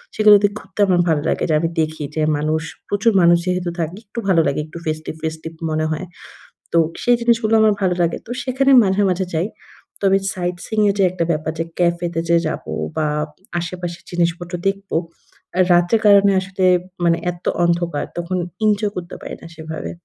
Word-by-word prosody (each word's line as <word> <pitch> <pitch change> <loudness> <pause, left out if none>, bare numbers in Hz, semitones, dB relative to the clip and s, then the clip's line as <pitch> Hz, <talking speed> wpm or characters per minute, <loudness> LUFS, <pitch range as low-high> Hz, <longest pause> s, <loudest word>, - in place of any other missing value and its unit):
সেগুলোতে 210 -1 +6
ঘুরতে 190 +2 -16
আমার 180 -2 +3
ভালো 155 -2 +2
লাগে - - -1
যে - - +2
আমি 165 +1 0
দেখি 155 -1 -3
যে 155 - 0 0.2
মানুষ 155 +1 0 0.3
প্রচুর 205 +3 +2
মানুষ 170 0 +6
যেহেতু 180 -1 -1
থাকে 165 +3 -3
একটু 205 +4 -6
ভালো 180 -4 +4
লাগে 140 - 0
একটু 155 +2 -11
ফেস্টিভ-ফেস্টিভ 160 +1 -4 0.2
মনে 155 0 0
হয়। 155 +4 -3 0.7
তো - - +4 0.3
সেই 245 - +4
জিনিসগুলো 230 -2 +2
আমার 215 -1 +5
ভালো 185 -2 +2
লাগে। 170 -1 +1
তো 235 - -8
সেখানে 270 +1 +2
মাঝে 190 0 +1
মাঝে 185 +1 0
যাই। 165 +5 +1 0.5
তবে 195 -1 +4 0.2
সাইটসিং 180 +4 -3
এর - - +2
যে - - +5
একটা 180 -2 -1
ব্যাপার 155 0 -1
যে 165 - 0
ক্যাফেতে 170 -1 0
যে 170 - +5
যাবো 80 - -5 0.3
বা 155 - +1 0.5
আশেপাশের 175 0 -5
জিনিসপত্র 175 0 -1
দেখব। 195 0 -3 0.8
রাতের 175 +6 +4
কারণে 200 -1 +6
আসলে 190 0 -2 0.4
মানে 170 -1 +3
এত 175 0 -14 0.2
অন্ধকার। 170 -3 0
তখন 175 +2 -2 0.3
ইনজয় 210 -1 +2
করতে 180 0 -6
পারি - - -6
না - - -10
সেভাবে। 160 -1 -6
175 Hz, 175 wpm, -20 LUFS, 165-195 Hz, 0.8 s, সেগুলোতে